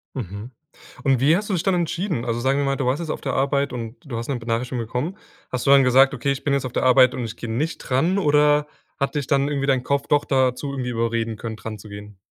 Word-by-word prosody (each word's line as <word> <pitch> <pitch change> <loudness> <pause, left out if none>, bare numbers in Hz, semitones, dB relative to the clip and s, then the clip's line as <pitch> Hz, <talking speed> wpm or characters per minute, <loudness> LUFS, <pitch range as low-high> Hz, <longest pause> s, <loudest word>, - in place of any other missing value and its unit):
Mhm. 105 -1 -6 0.5
Und 135 -3 +3
wie 145 +6 +4
hast 205 +3 -3
du - - 0
dich 175 - 0
dann 195 - +2
entschieden? 170 - -2
Also, 115 0 -1
sagen 135 +3 +1
wir 140 - 0
mal, 135 0 +1
du 135 - -2
warst 130 +3 +1
jetzt 165 - -5
auf - - -3
der - - -2
Arbeit 140 0 0
und 115 -1 -6
du 125 -5 -5
hast 115 +3 -5
'ne 135 - -1
Benachrichtigung 120 +1 -2
bekommen. 135 - -3 0.3
Hast 125 -2 -3
du - - +6
dann 140 -1 +7
gesagt: 135 +2 +5
„Okay, 140 +1 -1
ich 140 0 -4
bin 145 - +1
jetzt 140 -1 0
auf 125 - -5
der - - 0
Arbeit 130 0 +6
und 130 -3 -4
ich 115 0 -6
gehe 115 - -7
nicht 150 +8 -2
dran"? 160 +9 +1
Oder 150 -3 +3 0.3
hat 140 +1 -1
dich 145 -3 -2
dann 140 -1 +2
irgendwie 140 -2 -1
dein 130 -2 +2
Kopf 140 +1 -1
doch 145 -1 +3
dazu 130 +1 +1
irgendwie 130 -3 -3
überreden 115 -1 -1
können, 110 +1 -6
dran 110 -1 -7
zu 105 +1 -13
gehen? 105 0 -10
135 Hz, 270 wpm, -22 LUFS, 120-145 Hz, 0.5 s, dann